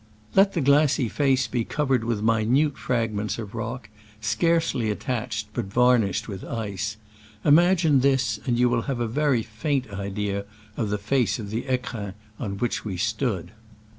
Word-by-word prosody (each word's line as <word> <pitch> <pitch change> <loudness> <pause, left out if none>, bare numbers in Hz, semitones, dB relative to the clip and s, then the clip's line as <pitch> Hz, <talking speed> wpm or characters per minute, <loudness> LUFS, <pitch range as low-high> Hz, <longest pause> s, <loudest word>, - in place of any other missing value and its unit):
Let 195 +1 +5
the 170 - 0
glassy 140 -1 +4
face 135 -1 +2
be 120 -2 -1
covered 135 -2 0
with 115 -2 -1
minute 115 +7 +2
fragments 110 -4 -1
of 105 -3 -7
rock, 115 +1 -5 0.3
scarcely 115 +2 +1
attached, 110 -1 -3
but 120 -2 -2
varnished 115 0 +2
with 100 -4 -6
ice: 110 -1 -4 0.5
imag 175 +4 +5
ine 145 -4 +5
this, 130 -4 +2
and - - -19
then - - -1
you 125 +1 +4
will 120 -1 +1
have 130 -3 -1
a 120 - 0
very 135 -1 +1
faint 125 +2 -2
idea 100 0 -3 0.3
of 110 -3 -1
the 105 - 0
face 120 +4 +1
of 105 -3 -7
the 115 +2 -1
fecrins 115 -6 -3 0.2
on 100 -4 -4
which 120 +3 -1
we 95 -4 -4
stood. 110 - -1
115 Hz, 165 wpm, -25 LUFS, 105-135 Hz, 0.5 s, Let